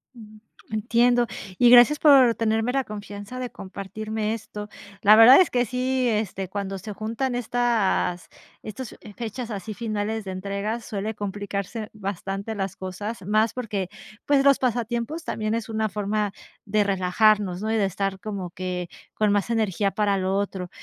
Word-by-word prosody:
Ujú. 215 -2 -14 0.3
Entiendo, 235 +2 +2 0.3
y 245 - +6
gracias 245 +5 +7
por 270 -6 +7
tenerme 225 +1 +1
la 270 0 +1
confianza 205 +3 -8
de 250 -1 -3
compartirme 215 +3 -4
esto. 210 -1 -7 0.3
La 210 +1 +8
verdad 250 +8 +9
es 365 - +3
que 245 0 +1
sí, 255 +2 0
este, 210 -4 -1
cuando 195 0 -4
se 210 +3 -7
juntan 230 +5 -2
estas 235 -7 0 0.3
estas, 225 +3 -7
eh, 210 - -12
fechas 235 +1 -5
así 205 +1 -5
finales 215 0 -3
de 190 - -6
entrega 200 +4 -3
suele 215 -1 -4
complicarse 205 +2 -4
bastante 200 +1 -4
las 195 -2 -3
cosas 195 +2 -6
más 215 +2 +2
porque, 205 -7 -3 0.4
pues, 280 -1 +3
los 280 -1 +6
pasatiempos 240 +5 -2
también 215 0 -2
es 230 -1 -3
una 220 -1 -1
forma 210 0 -1 0.3
de 210 0 +2
relajarnos, 195 0 +2
¿no?, 220 +1 -1
y - - +1
de 205 - +2
estar 195 0 -2
como 195 -4 -5
que 180 -1 -4 0.3
con 215 -1 +2
más 205 +2 +1
energía 210 -3 0
para 200 -1 +1
lo 190 +1 0
otro. 190 -3 -3
215 Hz, 160 wpm, -24 LUFS, 200-235 Hz, 0.4 s, verdad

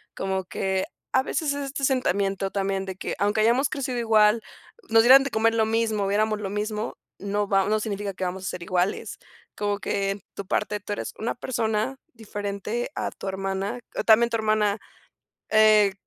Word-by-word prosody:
Como 190 0 -2
que 190 +1 -1 0.3
a 260 - +4
veces 290 +1 -1
es 285 0 -3
este 275 0 -2
sentimiento 195 -7 0
también 195 -1 -1
de 190 -1 -5
que, - - -4
aunque 205 +2 +1
hayamos 240 +5 +3
crecido 265 -4 -3
igual, 220 -1 +4 0.5
nos 225 0 +6
dieran 265 +3 +8
de 275 - -4
comer 225 0 +2
lo 220 -1 +3
mismo, 220 -2 0
viéramos 210 +2 +1
lo 195 - -3
mismo, 210 +2 -3 0.2
no 205 +1 -1
va 195 -1 +3
no 215 0 +2
significa 205 -2 -3
que 185 - -3
vamos 185 +1 -4
a - - -2
ser 180 - -6
iguales. 180 +2 -1 0.4
Como 205 -1 -1
que 195 -1 -1
en 195 0 -6
tu 200 - -6
parte 210 +1 -1
tú 205 - -7
eres 205 - -4
una 225 - -2
persona 225 0 -1 0.2
diferente 210 +1 -4
a - - -2
tu - - -9
hermana, 195 +4 -3 0.3
también 235 +1 +6
tu 230 - -1
hermana, 215 -2 +1 0.7
eh, 215 -2 +6
210 Hz, 185 wpm, -25 LUFS, 195-225 Hz, 0.7 s, dieran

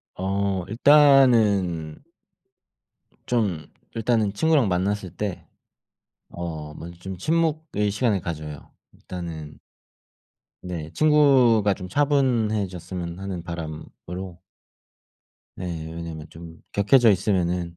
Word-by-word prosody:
아 95 -1 -1
일단은 110 - +4 1.3
좀 100 -11 -1 0.3
일단은 115 -2 +1
친구랑 145 0 +2
만났을 95 +1 -1
때 95 +2 -5 0.8
어 80 -3 -6
먼저 85 +2 -10
좀 95 0 -7
침묵의 155 - 0
시간을 105 -1 +1
가져요. 75 -4 -7 0.2
일단은 80 -4 -8 1.1
네, 85 -4 -6
친구가 135 -9 +4
좀 90 -1 -6
차분해졌으면 105 - 0
하는 95 -3 -5
바람으로 85 +2 -7 1.2
네, 80 -3 -5
왜냐하면 80 -2 -7
좀 80 0 -11 0.2
격해져 115 +4 +5
있으면은 90 -3 0
95 Hz, 205 characters per minute, -24 LUFS, 85-115 Hz, 1.3 s, 격해져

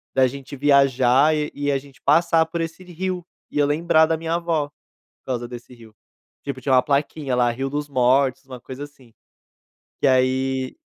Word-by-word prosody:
da 130 -1 +5
gente 140 +2 -8
viajar 140 0 +4
e 150 0 -2
e 145 0 -2
a - - +2
gente 135 -1 -13
passar 165 +2 +3
por 165 +1 -4
esse 165 +2 -6
rio, 180 +1 -4 0.3
e - - -5
eu 145 - +4
lembrar 160 +1 +3
da 160 - 0
minha 165 +1 -2
vó, 165 -4 -1
por - - -53 0.4
causa 120 -2 -3
desse 120 +1 -10
rio. 115 -2 -16 0.5
Tipo, 140 -2 -5
tinha 135 - 0
uma 125 - +5
plaquinha 140 -1 -1
lá, 120 -1 +3
"Rio 135 +3 -3
dos 145 +1 -3
Mortos", 130 +1 +2
uma 130 -2 -9
coisa 130 +3 -8
assim. 135 -5 -17 0.9
E - - +4
aí 130 - +1
140 Hz, 185 wpm, -22 LUFS, 130-155 Hz, 0.9 s, da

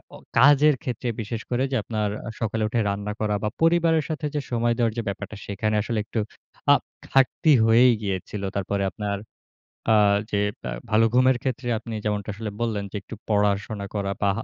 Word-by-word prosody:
অ - - -9 0.2
কাজের 145 +3 +6
ক্ষেত্রে 125 -3 -3
বিশেষ 110 +1 -4
করে। 125 +1 +1
যে - - 0
আপনার 105 -2 -1 0.2
আ - - -3
সকালে 110 -1 -1
উঠে 115 +2 -1
রান্না 100 +1 -3
করা 105 -1 0
বা 105 - +1
পরিবারের 165 -1 +4
সাথে 155 0 -3
যে - - +2
সময় 120 0 +2
দেওয়ার 115 -3 +1
যে - - +1
ব্যাপারটা। 100 +1 -5
সেখানে 105 +2 -1
আসলে 115 0 -2
একটু 110 - -3 0.5
আ - - +9 0.4
ঘাটতি 135 +4 +3
হয়েই 120 +3 +6
গিয়েছিল। 100 0 -3
তারপরে 100 0 -1
আপনার 100 -2 -3 0.8
আ - - +6 0.4
যে 100 - +1 0.3
আ - - -3 0.2
ভালো 110 +1 +5
ঘুমের 130 0 +4
ক্ষেত্রে 130 -1 -2
আপনি 115 0 -8
যেমনটা 105 -1 -1
আসলে 110 +1 -5
বললেন। 110 -3 -1
যে - - -9
একটু 110 - -9
পড়াশোনা 105 0 +1
করা 100 -1 -1
বা 100 - +3
হা 115 - -3
110 Hz, 185 wpm, -24 LUFS, 105-125 Hz, 0.8 s, আ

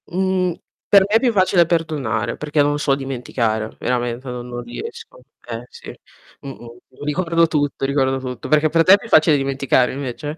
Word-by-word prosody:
Mhmm, 185 0 0 0.3
per 200 - +6
me 210 - 0
è - - +6
più 250 -1 +2
facile 185 -4 +3
perdonare 140 -10 -1
perché 150 0 0
non 145 0 +1
so 140 -2 +1
dimenticare, 120 -5 -3
veramente 120 +1 -2
non 125 0 -6
non 120 0 -6
riesco. 120 +1 -9 0.3
Eh 115 0 -6
sì, - - -11 0.5
mh-mh, 120 -3 -10 0.3
ricordo 165 +2 +1
tutto, 145 -3 -1
ricordo 135 -1 +1
tutto. 125 -2 -7
Perché 155 +1 +3
per 165 +2 +3
te 185 - +7
è - - +7
più 225 - -11
facile 155 -6 +5
dimenticare 135 -2 +1
invece? 140 +3 -5
140 Hz, 175 wpm, -20 LUFS, 125-165 Hz, 0.5 s, te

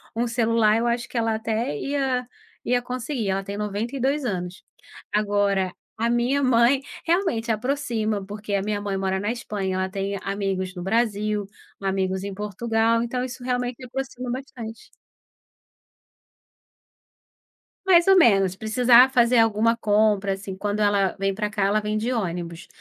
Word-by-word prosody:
um 235 +1 0
celular 230 -2 +2
eu 235 +1 0
acho 235 0 -1
que - - -6
ela 225 -1 +1
até 220 -7 -2
ia 265 - -1 0.4
ia 245 0 +2
conseguir. 245 -2 -3
Ela 195 +1 0
tem 200 +1 -6
92 240 +7 -1
anos. 180 -5 -4 0.5
Agora, 205 -3 +1 0.3
a 230 +1 0
minha 245 +4 +1
mãe 255 +1 +4 0.2
realmente 330 - +1
aproxima, 220 -4 -1
porque 205 +1 -6
a 195 - +2
minha 205 0 -2
mãe 200 -1 -2
mora 190 0 -1
na 205 +3 -1
Espanha, 205 -5 -3
ela 185 0 -1
tem 195 +1 -3
amigos 195 -2 -2
no 180 - -6
Brasil, 210 -1 0 0.4
amigos 190 -1 -1
em 200 -1 -5
Portugal, 225 +3 0
então, 250 +2 -2
isso 255 0 -7
realmente 245 0 -2
aproxima 255 0 -5
bastante. 240 -4 -7 3.0
Mais 345 -1 +6
ou 385 0 +7
menos, 195 - +5
se - - -17
precisar 245 +4 +5
fazer 240 -1 +4
alguma 225 +1 +3
compra, 205 -2 +2
assim. 195 0 -6
Quando 205 +1 -2
ela 205 -2 +2
vem 195 0 0
pra 210 0 -2
cá, 205 -2 0
ela 205 +2 +2
vem 210 0 -2
de 240 +3 -1
ônibus, 175 -5 -3
220 Hz, 155 wpm, -24 LUFS, 200-245 Hz, 3.0 s, ou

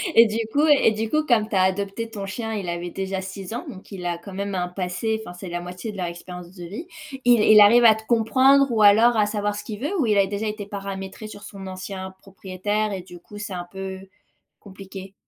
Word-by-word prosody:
Et 230 - +9
du 215 +1 -3 0.2
coup 295 +2 +4
et 285 -6 +5
du 220 +1 -2
coup, 310 0 +2
comme 220 -6 +2
tu 200 - -3
as 185 - +4
adopté 200 +4 -1
ton 200 -3 -5
chien, 225 +3 -4
il 195 -5 -3
avait 175 0 -4
déjà 190 0 -3
6 190 +2 -7
ans, - - -5
donc 190 +2 -11
il 180 -2 -7
a 170 -1 -2
quand 195 +1 -11
même 200 +1 -3
un 180 -1 -1
passé, 185 +5 -2
enfin, 175 - -8
c'est 180 0 -8
la 175 0 -3
moitié 180 +5 -6
de 200 - -10
leur 180 - -2
expérience 175 +1 -8
de 175 - -9
vie. 220 - -7 0.4
Il 240 -3 +6
il 215 0 +7
arrive 235 +4 +7
à 220 -1 +8
te 220 - -9
comprendre 260 +4 +4
ou 215 -2 +2
alors 225 +3 +6
à 210 - +4
savoir 205 -1 -2
ce 210 - -6
qu'il 210 -1 -7
veut 320 +8 -2
ou 265 - +2
il 210 -2 +2
a 195 -1 +4
déjà 205 +2 -3
été 210 -1 -4
paramétré 195 +1 -6
sur 205 -1 -10
son 195 -1 -9
ancien 190 0 -6
propriétaire 200 +2 -3
et 185 - -4
du 175 -1 -13
coup, 205 +4 -13
c'est 205 -1 -5
un 175 -1 -5
peu 190 -1 -6 0.6
compliqué? 195 -1 -10
200 Hz, 250 wpm, -23 LUFS, 185-220 Hz, 0.6 s, Et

